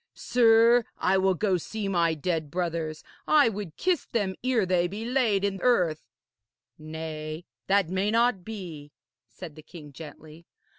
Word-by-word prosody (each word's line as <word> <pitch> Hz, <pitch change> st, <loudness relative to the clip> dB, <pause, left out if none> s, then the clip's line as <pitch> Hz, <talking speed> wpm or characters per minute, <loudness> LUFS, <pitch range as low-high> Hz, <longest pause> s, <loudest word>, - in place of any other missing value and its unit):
Sir, 235 Hz, 0 st, +4 dB
I 190 Hz, +1 st, +2 dB
will 190 Hz, 0 st, +2 dB
go 190 Hz, 0 st, +1 dB
see 210 Hz, +4 st, -5 dB
my 170 Hz, -4 st, +1 dB
dead 160 Hz, -1 st, -2 dB
brothers. 165 Hz, -2 st, -3 dB, 0.2 s
I 295 Hz, -5 st, +5 dB
would 200 Hz, -7 st, -7 dB
kiss 360 Hz, -3 st, 0 dB
them 200 Hz, -5 st, -1 dB
ere 250 Hz, -5 st, +2 dB
they 180 Hz, -1 st, +1 dB
be 205 Hz, +5 st, -6 dB
laid 235 Hz, -6 st, +1 dB
in 195 Hz, -1 st, -2 dB
earth.' 175 Hz, -, +1 dB, 0.7 s
'Nay, 155 Hz, +1 st, -6 dB, 0.2 s
that 195 Hz, -3 st, +2 dB
may 190 Hz, +2 st, 0 dB
not 230 Hz, -3 st, +2 dB
be,' 170 Hz, -9 st, -8 dB, 0.3 s
said 150 Hz, +8 st, -10 dB
the 155 Hz, -, -11 dB
king 150 Hz, -2 st, -13 dB
gently. 160 Hz, +2 st, -12 dB
185 Hz, 150 wpm, -27 LUFS, 160-220 Hz, 0.7 s, I